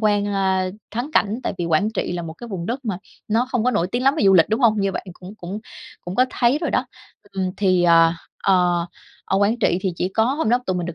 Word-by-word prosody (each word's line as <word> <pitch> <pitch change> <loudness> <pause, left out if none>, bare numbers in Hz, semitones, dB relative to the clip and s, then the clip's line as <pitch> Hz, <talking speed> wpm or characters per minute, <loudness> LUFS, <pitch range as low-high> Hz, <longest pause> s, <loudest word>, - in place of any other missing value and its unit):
quan, 205 -2 +2
ơ, 190 -2 0 0.2
thắng 240 +7 -4
cảnh. 220 +4 +1
Tại - - -2
vì 175 - -1
Quảng 170 +6 +1
Trị 200 - -2
là 175 - -3
một 165 -1 -6
cái 240 +8 -11
vùng 180 -5 -5
đất 255 +5 -4
mà 200 -6 -2 0.3
nó 230 +4 +1
không 245 -4 0
có 250 - +3
nổi 175 - 0
tiếng 245 - -1
lắm 270 +2 +4
về 310 - +1
du 195 -1 +6
lịch, 165 -3 +5
đúng 220 +4 0
hông? 220 -4 +3
Như 195 -1 0
bạn 190 - -5
cũng 185 +3 -12
cũng 190 +2 -6 0.4
cũng 175 - -7
có 255 - +4
thấy 245 +4 +2
rồi - - -2
đó. - - 0 0.5
Ừm, 190 -1 -2
thì, 185 -3 +2
à, 165 -1 +5 0.3
ờ, 180 -3 +2 0.4
ở - - 0
Quảng 205 +4 +2
Trị 185 -6 +2
thì 190 -2 -1
chỉ 180 - -1
có 220 +3 +1
hôm 275 +3 0
đó 245 +2 +4
tụi 185 - 0
mình 175 -1 -3
được 175 - -5
195 Hz, 270 wpm, -21 LUFS, 180-230 Hz, 0.5 s, du